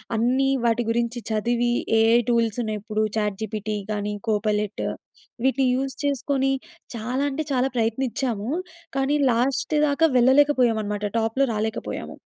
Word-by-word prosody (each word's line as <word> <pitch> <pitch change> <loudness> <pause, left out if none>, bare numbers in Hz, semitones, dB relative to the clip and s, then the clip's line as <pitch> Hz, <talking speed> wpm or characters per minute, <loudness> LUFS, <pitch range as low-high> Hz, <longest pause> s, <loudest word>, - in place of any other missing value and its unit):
అన్నీ 255 +4 +2 0.2
వాటి 235 0 +2
గురించి 235 +1 -1
చదివి, 235 +2 +1 0.3
ఏఐ 225 +1 +5
టూల్స్ 230 -1 +1
ఉన్నయి 215 -1 -3
ఇప్పుడు. 215 0 -1
చాట్ 210 -2 0
జీపీటీ 215 0 -3 0.2
గాని, 210 0 -2 0.2
కోపైలెట్ 210 -1 0 0.6
వీటిని 265 0 +2
యూజ్ 265 +1 -2
చేసుకొని, 270 -1 0 0.4
చాలా 245 +5 -2
అంటే 300 +3 -3
చాలా 260 0 +2
ప్రయత్నించాము. 230 -1 -1 0.5
కానీ 270 +2 +2
లాస్ట్ 255 +6 0
దాకా 290 +3 +3
వెళ్ళలేకపోయామనమాట. 245 -6 +3 0.2
టాప్‌లో 225 +5 +1
రాలేకపోయాము. 220 +1 -4
235 Hz, 120 wpm, -24 LUFS, 215-265 Hz, 0.6 s, ఏఐ